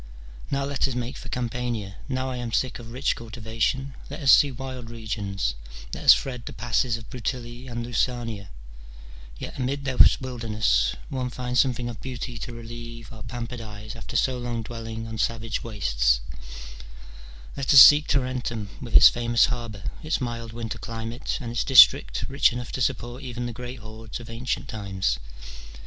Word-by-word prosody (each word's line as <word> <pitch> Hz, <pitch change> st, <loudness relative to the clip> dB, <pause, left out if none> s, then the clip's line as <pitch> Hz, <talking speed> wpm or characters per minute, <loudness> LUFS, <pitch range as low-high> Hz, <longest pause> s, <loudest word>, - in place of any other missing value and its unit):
" -, -, -16 dB
Now 140 Hz, 0 st, 0 dB
let 140 Hz, -1 st, 0 dB
us 130 Hz, -, -4 dB
make 125 Hz, +1 st, -3 dB
for 130 Hz, -, -9 dB
Campania: 120 Hz, -5 st, -3 dB
now 130 Hz, 0 st, -1 dB
I 125 Hz, -, -4 dB
am 120 Hz, -1 st, -4 dB
sick 130 Hz, +2 st, 0 dB
of 115 Hz, -1 st, -10 dB
rich 130 Hz, +3 st, 0 dB
cultivation: 115 Hz, +4 st, -2 dB, 0.2 s
let -, -, -7 dB
us 135 Hz, -3 st, +6 dB
see 145 Hz, -, +7 dB
wild 130 Hz, -2 st, -7 dB
regions, 105 Hz, -, -3 dB, 0.4 s
let -, -, -5 dB
us -, -, +11 dB
thread 125 Hz, -3 st, -5 dB
the -, -, -5 dB
passes 115 Hz, +2 st, 0 dB
of 115 Hz, -, -12 dB
Bruttii 120 Hz, 0 st, -5 dB
and 120 Hz, 0 st, -4 dB
Lucania: 120 Hz, -4 st, -2 dB, 0.9 s
yet -, -, -7 dB
amid 135 Hz, +2 st, -2 dB
this 130 Hz, -2 st, +6 dB
wilderness 110 Hz, -, 0 dB
one 125 Hz, -2 st, -3 dB
wants 125 Hz, -1 st, +2 dB
some 130 Hz, -2 st, +1 dB
thing 120 Hz, 0 st, -4 dB
of 120 Hz, -2 st, -7 dB
beauty 125 Hz, -2 st, -5 dB
to 125 Hz, -, -6 dB
relieve 115 Hz, 0 st, -9 dB
our 110 Hz, -, -11 dB
pampered 120 Hz, 0 st, -6 dB
eyes 110 Hz, 0 st, -8 dB
after 115 Hz, +1 st, -8 dB
so 125 Hz, +1 st, +2 dB
long 120 Hz, -1 st, -3 dB
dwelling 115 Hz, 0 st, -6 dB
on 110 Hz, 0 st, -6 dB
savage 115 Hz, -1 st, -1 dB
wastes: -, -, +1 dB, 1.3 s
let 140 Hz, -2 st, 0 dB
us 135 Hz, -, +10 dB
seek 150 Hz, +4 st, +10 dB
Tarentum 125 Hz, -5 st, -1 dB
with 120 Hz, -3 st, -7 dB
its -, -, +11 dB
famous 120 Hz, -1 st, +3 dB
harbour, 115 Hz, -5 st, -6 dB, 0.2 s
its 155 Hz, 0 st, -1 dB
mild 115 Hz, -2 st, -4 dB
winter 115 Hz, 0 st, -5 dB
climate, 115 Hz, +2 st, -4 dB
and 120 Hz, -4 st, -5 dB
its 120 Hz, -, 0 dB
district, 60 Hz, -, +6 dB
rich 140 Hz, +1 st, +3 dB
enough 120 Hz, 0 st, -5 dB
to 130 Hz, -, -3 dB
support 120 Hz, 0 st, -1 dB
even 120 Hz, -2 st, -5 dB
the 120 Hz, -, -4 dB
great 125 Hz, +2 st, -7 dB
hordes 110 Hz, 0 st, -8 dB
of 115 Hz, -1 st, -10 dB
ancient 120 Hz, +3 st, -3 dB
times. 95 Hz, -, -2 dB
120 Hz, 175 wpm, -25 LUFS, 110-125 Hz, 1.3 s, us